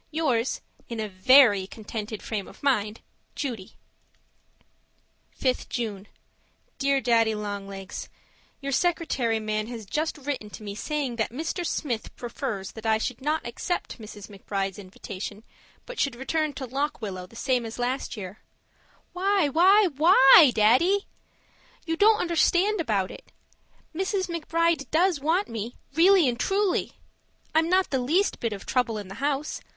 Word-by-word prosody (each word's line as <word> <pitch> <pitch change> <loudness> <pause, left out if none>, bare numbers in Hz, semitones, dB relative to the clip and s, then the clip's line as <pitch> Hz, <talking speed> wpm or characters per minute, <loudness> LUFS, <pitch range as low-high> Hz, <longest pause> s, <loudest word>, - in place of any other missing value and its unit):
Yours, 270 -7 0 0.3
In 230 -2 -5
a 215 - -2
VERY 205 0 +5
contented 215 0 -6
frame 210 -4 -4
of - - -15
mind, 215 -6 0 0.3
Judy 235 -10 -5 1.7
5th 255 -2 0
June 210 -5 -4 0.7
Dear 275 0 +2
Daddy 230 -2 +2
Long 205 -1 -5
Legs, 195 -1 -7 0.5
Your 275 0 -3
secretary 275 -8 +1
man 215 0 -2
has 230 -3 -7
just 310 +10 -2
written 275 -7 -4
to 215 - -10
me 200 -1 -5
saying 275 +1 -3
that 220 - 0
Mr. 320 +8 -3
Smith 250 -9 -3
prefers 235 -5 -5
that 220 0 -7
I 220 0 +4
should 230 +2 -4
not 305 +3 -1
accept 250 +5 -4
Mrs. 210 -2 -10
McBride's 195 -1 -4
invitation, 200 +2 -8 0.4
but - - -8
should 275 -3 +1
return 305 +4 -1
to 270 - -5
Lock 275 +4 -2
Willow 185 -5 -6
the 230 - -18
same 250 0 0
as 225 0 -7
last 250 +2 -2
summer. 200 -1 -8 0.7
Why, 380 -3 +2
why, 380 +7 +5
WHY, 300 -3 +8
Daddy? 270 - +4 0.8
You 325 -1 -1
don't 425 +5 +5
understand 355 +3 +2
about 205 - 0
it. - - -13 0.6
Mrs. 380 +2 -1
McBride 335 -3 0
does 345 0 +2
want 330 +8 +1
me, 230 +1 -5 0.2
really 350 0 +5
and 240 -1 -1
truly. 390 +5 0 0.6
I'm 320 +1 +3
not 375 +1 +2
the 265 - +1
least 330 +11 +1
bit 230 - -1
of 200 -2 -7
trouble 245 -4 0
in 205 -2 -6
the 195 - -8
house. 290 +1 -1
255 Hz, 150 wpm, -26 LUFS, 215-320 Hz, 1.7 s, WHY